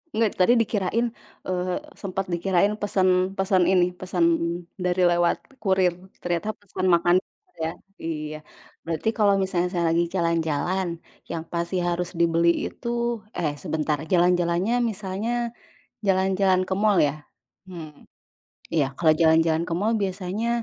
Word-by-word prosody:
Enggak, 220 -2 +2
tadi 210 +7 +5
dikirain, 225 +1 +1 0.4
eee, 180 0 -1 0.2
sempet 195 -1 -3
dikirain 190 +3 +2
pesen, 185 -1 +2
pesen 190 -1 +3
ini, 180 -1 +3
pesan 180 -1 0 0.5
dari 180 0 +2
lewat 175 0 +3 0.2
kurir, 190 -3 +2 0.3
ternyata 175 +4 -1
pesan 185 -2 -2
makan 175 0 +4 0.5
ya, 160 +2 -2 0.3
iya. 155 -1 -4 0.5
Berarti 165 +6 -1
kalo 205 -2 +3
misalnya 185 -2 0
saya 175 -2 -1
lagi 170 +1 +2
jalan-jalan, 170 0 0 0.3
yang 165 -1 -3
pasti 170 +2 -3
harus 175 0 -1
dibeli 170 0 +3 0.2
itu, 235 -1 -2 0.2
eh, 155 -4 0
sebentar, 155 -3 -1
jalan-jalannya 180 +5 +2
misalnya 225 +2 -2 0.5
jalan-jalan 190 0 +3
ke 190 - 0
mal 210 -1 +3
ya? 150 +1 -1 0.4
Hmm, 160 -5 -10 0.7
iya 155 -4 +2
kalau 160 -2 +4
jalan-jalan 160 0 +4
ke 165 - -2
mal 205 +6 +1
biasanya 195 +2 -2
180 Hz, 130 wpm, -24 LUFS, 170-195 Hz, 0.7 s, tadi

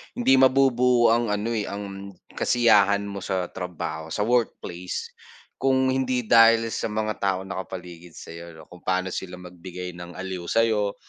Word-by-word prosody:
hindi 135 - +4
mabubuo 125 -3 +4
ang 120 0 +2
ano 105 +2 -1
eh, 110 -3 -2
ang, 100 -1 -7 0.2
kasiyahan 100 -4 +3
mo 100 -1 -6
sa 95 -2 -3
trabaho, 80 -3 -5
sa 105 - -1
workplace, 110 -7 -2 0.5
kung 130 0 +2
hindi 130 -2 0
dahil 115 0 +6
sa - - -2
mga 110 0 -2
taong 95 -1 -1
nakapaligid 90 -2 -8
sa'yo 85 +1 -9
'no? 80 - -13
Kung 90 - -12
paano 95 0 0
sila 90 -1 -5
magbigay 90 0 -8
ng 90 -1 -10
aliw 95 -1 -5
sa'yo, 110 -3 +1
100 Hz, 150 wpm, -24 LUFS, 90-115 Hz, 0.5 s, dahil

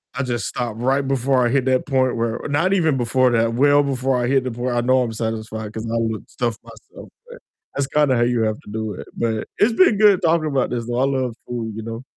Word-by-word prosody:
I 140 - -1
just 120 -5 -2
stop 120 -3 -4
right 135 +3 +1
before 130 -1 +1
I 120 - +2
hit 135 0 +1
that 130 -1 +1
point 130 -3 +1
where 115 0 -1
not 165 +7 +1
even 160 -7 +2
before 130 +1 +2
that, 115 0 +1
well 145 +3 +4
before 135 -1 0
I 120 - 0
hit 135 -1 +2
the 130 - -2
point 120 +1 -3
I 120 - +2
know 130 +1 +3
I'm 115 - -4
satisfied 110 -1 -4
'cause 110 +1 -6
I 115 0 -3
will 110 -2 -1
stuff 120 -3 -3
myself, - - -14 0.2
but - - -10 0.4
that's 140 - 0
kinda 145 -3 +2
how 120 - +2
you 120 -1 +1
have 110 -1 -1
to - - -14
do 110 -1 -3
it. - - -9
But 110 -2 -2
it's 220 +3 +4
been 340 - +4
good 205 -3 +5
talking 165 -1 +2
about 135 -4 0
this 120 -1 -3
though. 120 - -2
I 135 - +3
love 130 -4 -1
food, 115 -3 -4
you 110 - -6
know. 115 +2 -6
125 Hz, 250 wpm, -21 LUFS, 115-135 Hz, 0.4 s, good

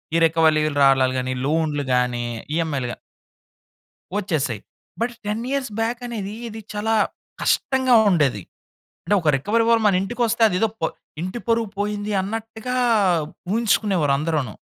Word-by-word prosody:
ఈ - - +5
రికవలిలు 160 -2 +3
రాలలు 135 -1 +4
గాని, 130 0 -2
లోన్‌లు 150 -1 0
గాని, 125 -1 +1 0.3
ఈఎంఐలు 155 -6 -1
గా - - -6 1.2
వచ్చేసాయి. 150 - -1 0.4
బట్ 240 +1 0
10 210 +3 -2
ఇయర్స్ 275 -4 -2
బ్యాక్ 230 +1 -1
అనేది 210 -4 -5 0.2
ఇది 220 0 -8
చాలా 215 +2 -1 0.5
కష్టంగా 260 -2 +2
ఉండేది. 145 - +2 0.6
అంటే 205 - +3
ఒక 160 - +2
రికవరీ 225 - +1
వాళ్ళు 230 -1 +4
మన 195 - +3
ఇంటికి 240 +5 -4
వస్తే 230 +1 -2
అది 180 - -2
ఏదో 225 - +3
ప - - -4 0.4
ఇంటి 185 +7 -4
పరువు 230 -1 +2
పోయింది 205 0 -2
అన్నట్టుగా 225 +4 -5 0.8
ఉహించుకునేవారు 200 -9 +2
అందరును. 150 -6 -1
195 Hz, 140 wpm, -22 LUFS, 150-225 Hz, 1.2 s, ఈ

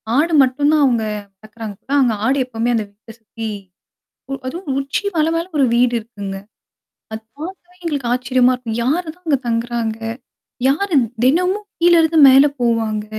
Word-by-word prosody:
ஆடு 320 +5 +2
மட்டும் 270 +3 +2
தான் 300 - +4
அவங்க 235 -4 +1 0.4
வளக்கறாங்க. 215 -1 -8 0.3
அங்க 240 -4 +2
ஆடு 270 +4 +2
எப்பவுமே 235 -1 -2
அந்த 220 - 0
வீட்ட 215 +3 -16
சுத்தி, 225 +1 -7 1.0
அதுவும் 325 +3 -6
உச்சி 275 +8 -2
மலை 320 0 +2
மேல 335 +1 -1
ஒரு 275 - +4
வீடு 245 0 +3
இருக்குங்க. 205 -4 -7 0.7
அதை 220 0 -5 0.2
பார்க்கவே 360 +2 -9
எங்களுக்கு 280 -7 -2
ஆச்சரியமா 255 0 +2
இருக்கும். 235 -2 -5
யாரு 320 +8 0
தான் 360 0 -30
அங்க 285 -3 +3
தங்குறாங்க? 230 -1 -2 0.7
யாரு 345 +4 0 0.3
தினமும் 365 +9 +1
கீழே 345 0 +5
இருந்து 320 0 +2
மேல 270 +2 +7 0.2
போவாங்க? 225 -3 0
255 Hz, 150 wpm, -18 LUFS, 230-315 Hz, 1.0 s, மேல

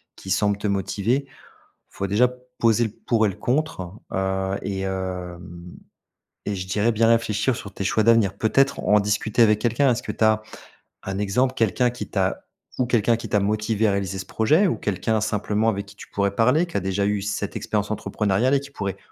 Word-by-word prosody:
qui 95 - -11
semble 100 +1 +2
te 105 - -3
motiver. 100 +7 0 0.4
Il - - -30
faut 100 - -2
déjà 105 +6 +4 0.3
poser 115 0 +3
le - - -2
pour 115 +1 0
et - - +2
le 95 - -6
contre, 125 - -2 0.2
heu, 95 0 -1
et 95 -1 -3
hem, 95 -2 -4 1.1
et 105 - -2
je 95 0 -5
dirais 105 +5 +1
bien 115 +1 +3
réfléchir 115 +1 +2
sur 100 -5 -8
tes 95 - -5
choix 110 +3 +2
d'avenir. 110 -3 +3
Peut-être 135 +6 +2
en 105 - +4
discuter 105 +3 +1
avec 105 -1 +4
quelqu'un. 120 +4 +2
Est-ce 120 - 0
que - - -4
tu 110 - 0
as 110 0 +3 0.6
un 95 0 -4
exemple, 125 +6 +1
quelqu'un 120 +2 +2
qui 125 - -6
t'a - - -1 0.3
ou 125 - +2
quelqu'un 115 -1 +2
qui 115 - -8
t'a 105 - +2
motivé 105 +2 0
à - - +3
réaliser 100 -1 -2
ce 95 - -5
projet, 150 - +2
ou 175 - 0
quelqu'un 105 +2 -1
simplement 105 +1 0
avec 100 -2 -2
qui 100 +1 -15
tu - - -12
pourrais 100 -1 0
parler 125 - +3
qui 170 - -14
a - - +2
déjà 95 +1 -1
eu 105 0 0
cette 100 0 -3
expérience 105 0 -2
entrepreneuriale 110 +4 +1
et - - +3
qui 140 +1 -11
pourrait, 100 -7 -4
105 Hz, 205 wpm, -23 LUFS, 100-115 Hz, 1.1 s, déjà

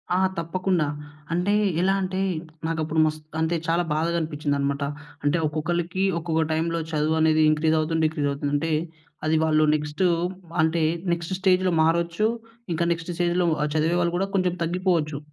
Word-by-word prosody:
ఆ! - - +3 0.2
తప్పకుండా. 175 0 0 0.5
అంటే 180 +4 +1 0.3
ఎలా 195 +1 +3
అంటే 185 0 -2 0.5
నాకు 165 -1 -2
అప్పుడు 160 +1 -1
మస్త్ 155 0 -3
అంటే 160 +1 +1
చాలా 170 +1 +2
బాధగా 165 +2 0
అనిపించింది 150 -2 -2
అన్నమాట. 140 0 -1 0.4
అంటే 145 +3 +2
ఒక్కొక్కళ్ళకి 170 +4 -1 0.2
ఒక్కొక్క 160 -1 0
టైమ్‌లో 165 +1 0
చదువు 155 +1 +1
అనేది 155 0 +4
ఇంక్రీస్ 155 +1 +2
అవుతుంది, 160 +1 0
డిక్రీస్ 150 -2 0
అవుతుంది. 140 0 -3
అంటే 160 +2 0 0.5
అది 155 +1 +2
వాళ్ళు 155 -1 +3
నెక్స్ట్ 150 +4 -2 0.6
అంటే 160 0 +2 0.3
నెక్స్ట్ 170 +2 -4
స్టేజ్‌లో 185 -1 +3
మారొచ్చు. 170 +5 +2 0.5
ఇంకా 170 +1 0
నెక్స్ట్ 165 +1 -6
స్టేజ్‌లో 175 0 +1 0.3
చదివేవాళ్ళు 170 +2 +1
కూడా 195 +1 0
కొంచెం 180 -2 +1
తగ్గిపోవచ్చు. 170 -4 0
165 Hz, 150 wpm, -24 LUFS, 155-175 Hz, 0.6 s, అనేది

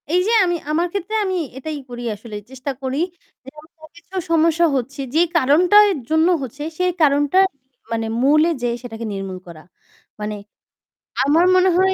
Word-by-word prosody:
এই 360 - +4
যে 455 - +2
আমি 350 -1 0 0.2
আমার 335 +3 +1
ক্ষেত্রে 400 +2 -4
আমি 375 -1 -1 0.2
এটাই 300 +2 -5
করি 240 0 -7
আসলে 210 +1 -10
চেষ্টা 265 +1 -5
করি 265 +1 -2 0.4
যে 265 - -10
আমার 315 0 -17
কিছু 335 +3 -15 0.2
সমস্যা 330 +1 +3
হচ্ছে 270 +2 -3
যে 325 - +5 0.2
কারণটার 355 +9 +5 0.2
জন্য 315 +1 +3
হচ্ছে 270 +3 -6
সেই 365 0 +1
কারণটা 290 +3 +3 0.5
মানে 225 -1 -1 0.2
মূলে 305 +4 +4
যে 245 - 0
সেটাকে 230 -2 -7
নির্মূল 195 -1 -5
করা। 160 -2 -12 0.6
মানে 210 0 -3 0.9
আমার 315 +5 +4
মনে 370 0 +4
হয় 380 +1 +3
300 Hz, 160 wpm, -20 LUFS, 255-345 Hz, 0.9 s, যে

